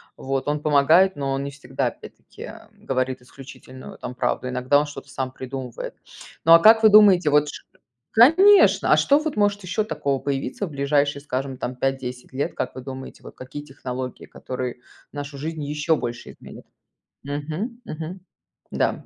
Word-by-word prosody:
Вот, 135 +1 -3
он 150 0 -1
помогает, 155 +6 +4
но 140 -1 -2
он 135 - -2
не 140 - -5
всегда 135 -2 -3
опять - - -9
таки - - -11 0.2
говорит 130 -1 -3
исключительную, 130 0 -12
там, 125 - -7
правду 125 - -1
иногда 130 +3 +2
он 150 - 0
что-то 145 -1 -10
сам 130 -1 -4
придумывает. 130 -2 -7 0.5
Ну 165 - +8
а 170 - +9
как 220 +3 +6
вы 220 - +8
думаете 200 -6 +6
вот 150 0 +3
ш - - -9 0.5
конечно, 350 - +6
а - - +6
что 285 +1 +4
вот 310 -4 -3
может 205 -1 +1
ещё 185 +4 -1
такого 140 -10 -2
появиться 135 +7 -3
в 165 - -9
ближайшие 140 0 0
скажем 135 -1 -4
там 125 0 -4
5-10 125 -1 -4
лет 140 - -2
как - - -3
вы 130 - -7
думаете 130 0 -9
вот - - -12
какие 130 +3 -8
технологии 130 -2 -7
которые 125 -1 -6 0.3
нашу 145 -1 -7
жизнь 160 +1 -5
еще 150 +2 0
больше 120 -3 -6
изменят? - - -13 0.6
Мгм, 155 - -5
мгм. 165 +4 -7 0.5
Да. - - -1
145 Hz, 170 wpm, -23 LUFS, 130-165 Hz, 0.6 s, а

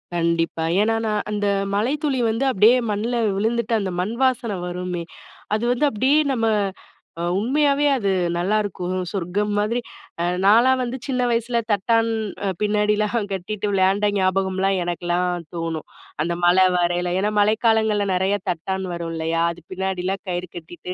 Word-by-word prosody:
கண்டிப்பா. 165 -1 0 0.2
ஏன்னா, 225 +1 +2
நான் 210 -1 0
அந்த, 205 -1 -1 0.3
மழைத்துளி 270 +5 0
வந்து 225 +5 0
அப்படியே 225 +2 +5 0.2
மண்ணுல 220 +4 -1 0.2
விழுந்துட்டு, 235 +3 0
அந்த 190 -2 -2
மண் 210 +6 -3
வாசனை 240 -6 +1
வருமே? 180 -1 -4 0.5
அது 220 - -2
வந்து 290 +4 +2
அப்படியே 265 +8 +3
நம்ம 225 -3 0 0.8
அ, - - -2
உண்மையாவே 280 +6 +2
அது 210 -7 -1 0.3
நல்லாருக்கும், 185 0 -1 0.2
சொர்க்கம் 200 +2 -1
மாதிரி. 220 +4 0 0.4
அ - - +1 0.2
நான்லாம் 240 +6 +5
வந்து 250 +1 -3
சின்ன 255 -2 0
வயசுல 235 +1 0
தட்டான், 225 +3 +2 0.4
அ - - 0
பின்னாடிலாம் 210 +1 +1
கட்டிட்டு 200 +2 -3
விளையாண்ட 195 +1 +2
ஞாபகம்லாம், 190 0 +1
எனக்குலாம் 175 0 -1
தோணும். 165 -2 -4 0.4
அந்த 170 +1 -2
மழை 180 +2 +5
வரையில. 175 0 0
ஏன்னா, 205 +2 0
மழைக்காலங்கள்ல 220 0 +2
நிறையா 190 +2 +1
தட்டான் 190 +3 -2
வரும் 170 -1 -4
இல்லயா? 165 +1 -1
அது 175 - -15
பின்னாடிலாம் 190 0 -2
கயிறு 180 0 -3
கட்டிட்டு, 175 +2 -8
205 Hz, 140 wpm, -22 LUFS, 180-225 Hz, 0.8 s, அப்படியே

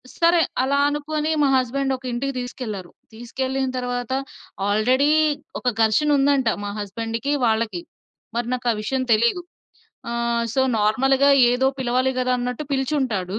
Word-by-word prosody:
స్ - - -15
సరే. 335 +1 +5 0.2
అలా 275 +2 +1
అనుకోని 300 +1 -2
మా 285 - +4
హస్బండొక 265 +1 -1
ఇంటికి 275 +3 -2
తీసుకెళ్లారు, 220 -7 -6 0.2
తీసుకెళ్ళిన 260 +3 -3
తర్వాత, 245 -1 -3 0.6
ఆల్రెడీ 250 +8 +2 0.5
ఒక - - -22 0.2
ఘర్షణుందంట, 275 +3 +3 0.2
మా 205 - -3
హస్బండ్‌కి, 225 +6 -3
వాళ్ళకి. 220 -5 0 0.5
మరి 235 0 -1
నాకా 250 -1 -1
విషయం 260 +4 -1
తెలీదు. 235 +11 +2 0.7
ఆహ్, 235 0 0
సో, 265 - +2 0.2
నార్మల్‌గా 265 +6 +3 0.2
ఏదో 250 +2 +2
పిలవాలి 255 +1 +1
గదా! 255 0 +1
అన్నట్టు 250 +4 -3
పిలిచుంటాడు. 255 -9 -1
250 Hz, 125 wpm, -22 LUFS, 230-270 Hz, 0.7 s, సరే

